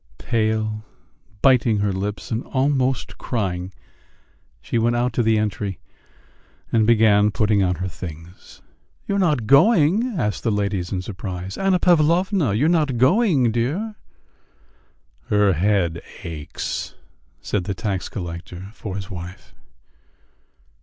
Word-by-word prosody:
Pale, 110 -2 -1 0.6
biting 125 -5 +4
her 100 -1 0
lips, 100 +4 -4
and 115 +2 -1
almost 130 - 0
crying, 95 -6 -3 0.9
she 115 - -2
went 120 +1 +2
out 120 +1 0
to - - +1
the 110 -1 +3
entry 105 -3 -2 0.9
and 110 -2 +3
began 105 -2 +5
putting 105 -2 +2
on 90 -1 +1
her 90 +3 -3
things. 85 0 -10 0.4
"You 200 - 0
are - - +1
not 150 - +1
going?" 185 - +4
asked 105 - -1
the 115 - 0
ladies 100 -3 -1
in 95 -1 -2
surprise. 95 -1 -6
"Anna 195 -1 +2
Pavlovna, 175 - +3
you 125 +8 +2
are - - +4
not 150 -7 +1
going, 140 - +3
dear?" 150 - -1 1.3
"Her 105 -2 +3
head 85 -2 +1 0.2
aches," 75 -3 -5 0.4
said 90 +6 -2
the 100 -1 -3
tax 100 -3 -3
collector 90 +1 -7
for 100 -4 -6
his 100 +1 -6
wife. 90 +2 -9
110 Hz, 130 wpm, -22 LUFS, 95-130 Hz, 1.3 s, began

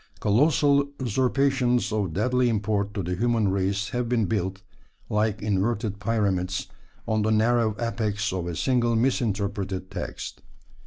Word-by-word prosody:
Colossal 140 +5 +3
usurpations 130 0 +1
of 105 -5 -1
deadly 125 +5 +2
import 105 -2 0
to 100 - -2
the 90 +2 -2
human 115 0 +1
race 100 +1 0
have 120 -2 -2
been 120 -3 +2
built, 95 -2 -2 0.5
like 105 0 0
inverted 105 0 0
pyramids, 100 -4 0 0.4
on 110 -1 +1
the 105 - +1
narrow 110 0 +2
apex 105 -4 -1
of 90 -2 -3
a 85 - -3
single 120 - +1
misinterpreted 100 -6 -1
text. - - -6
110 Hz, 135 wpm, -25 LUFS, 100-120 Hz, 0.5 s, Colossal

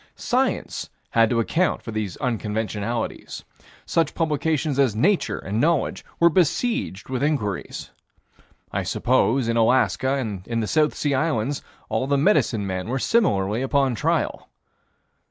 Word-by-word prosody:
Science - - -1 0.2
had 115 -1 +4
to 120 - +1
account 170 +10 0
for 115 - -6
these 110 -4 -3
unconventionalities. 110 -1 -3 0.4
Such 165 - 0
publications 155 -2 0
as 130 -6 +3
Nature 180 - +2
and 105 +4 -2
Knowledge 165 -1 +1 0.2
were 170 0 +6
besieged 170 - 0
with 130 -1 -2
inquiries. 135 - -2 0.8
I - - -1
suppose, 125 0 +1
in 115 0 +1
Alaska 130 +3 +2
and 110 -8 -3
in 115 -1 -1
the 110 - 0
South 150 +6 +2
Sea 145 -2 0
Islands, 140 -2 0 0.3
all 130 - -1
the 140 0 +2
medicine 135 - +2
men 95 0 -3
were 130 +3 -1
similarly 115 - +1
upon 135 -1 +2
trial. 115 - -1
130 Hz, 135 wpm, -23 LUFS, 110-150 Hz, 0.8 s, were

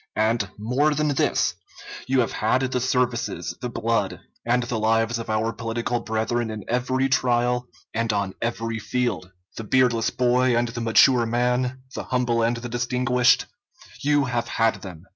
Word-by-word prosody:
And, 110 -2 +1
more 130 +8 +1
than 150 +1 +1
this, 140 - +1 0.5
you 130 0 +3
have 115 - -1
had 115 +4 +1
the 125 -1 -1
services, 125 -2 -1
the 125 - -3
blood, 115 0 -1 0.2
and 120 +1 +1
the 120 -2 -3
lives 115 +1 +1
of 115 - -7
our 110 +1 0
political 115 +1 -2
brethren 115 +1 -1
in 110 -2 -6
every 130 +2 0
trial, 125 -1 +1 0.3
and 115 0 0
on 100 -2 -1
every 115 -1 -2
field. 110 -5 -2 0.3
The 115 - -4
beardless 120 0 +2
boy 125 0 +2
and 120 0 +1
the 120 0 -5
mature 115 +1 +4
man, 125 +2 0
the - - -5
humble 125 -2 0
and 115 +1 +1
the 120 +1 -6
distinguished, 125 0 +2 0.6
you 145 0 +3
have 120 -2 -2
had 115 -1 +1
them. 90 -3 -10
120 Hz, 160 wpm, -24 LUFS, 115-125 Hz, 0.6 s, mature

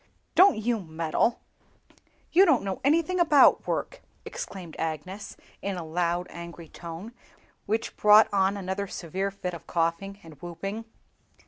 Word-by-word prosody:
"Don't 380 - +6
you 225 +1 0
meddle; 165 +5 -1 0.9
you 365 +4 +7
don't 310 -10 +4
know 195 -1 -4
anything 335 +6 +2
about 310 -5 +5
work!" - - -3 0.2
exclaimed 180 -5 -7
Agnes, 165 +5 -5 0.2
in 195 -2 -3
a 170 - -5
loud, 175 +2 -1
angry 170 -1 -9
tone, 170 +6 -8 0.6
which 220 +2 -1
brought 210 +1 +7
on 195 0 +2
another 195 +1 -3
severe 190 +3 -3
fit 190 -2 -5
of 170 -2 -10
coughing 170 +4 -1
and 155 -4 -14
whooping. 195 +6 -5
190 Hz, 135 wpm, -27 LUFS, 170-220 Hz, 0.9 s, you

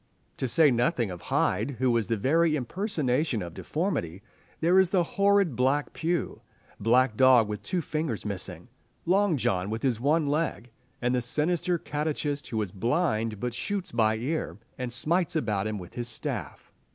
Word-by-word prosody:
To 130 - -1
say 145 +5 +5
nothing 120 - +1
of 90 - -8
Hyde, 110 +9 +1
who 130 +1 +2
was 115 -3 +1
the 115 -1 0
very 155 +8 +2
impersonation 145 - -1
of 85 -1 -8
deformity, 100 - -3 0.4
there 175 +3 +4
is 190 -2 +4
the 185 -2 +3
horrid 200 -4 +2
blind 135 +2 +1
Pew, 170 +1 -2 0.4
Black 120 +2 +3
Dog 130 -3 +6
with 105 -1 -5
two 175 - -2
fingers 155 -10 -3
missing, 95 -3 -3 0.4
Long 185 -1 +3
John 95 -5 0
with 110 +1 -4
his 125 -5 +1
one 150 +5 +2
leg, 145 -5 -1 0.3
and 125 +1 +2
the 125 - +1
sinister 165 +7 0
catechist 150 -2 -3
who 110 - -2
is 95 - -7
blind 115 - 0
but 125 +2 -3
shoots 190 - -3
by 110 -2 +2
ear, 145 +8 -3 0.2
and 125 -2 -4
smites 170 +7 0
about 105 -9 0
him 110 -1 -3
with 90 -3 -10
his 120 -1 -4
staff. 110 - -5
130 Hz, 170 wpm, -27 LUFS, 110-165 Hz, 0.4 s, Dog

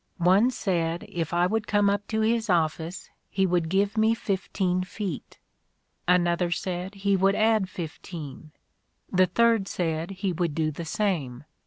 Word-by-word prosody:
One 190 +7 +4
said 170 -8 -1
if 165 -3 -3
I 175 +1 +3
would 215 +3 -1
come 205 -1 +3
up 200 0 0
to 220 0 -1
his 225 0 +1
office 165 0 -1 0.2
he 190 0 +1
would 175 -3 +1
give 200 +4 +1
me 220 +1 +4
fifteen 190 -3 -1
feet; 185 -4 -6 0.7
another 175 0 +3
said 180 +2 -3
he 200 0 +1
would 195 +1 +3
add 215 -3 +2
fifteen; 160 -3 -8 0.6
the 185 0 +5
third 225 +1 +3
said 165 -2 -2
he 190 -1 -2
would 170 -3 -1
do 155 -1 0
the 165 +3 -6
same. 160 - -2
185 Hz, 155 wpm, -26 LUFS, 170-205 Hz, 0.7 s, the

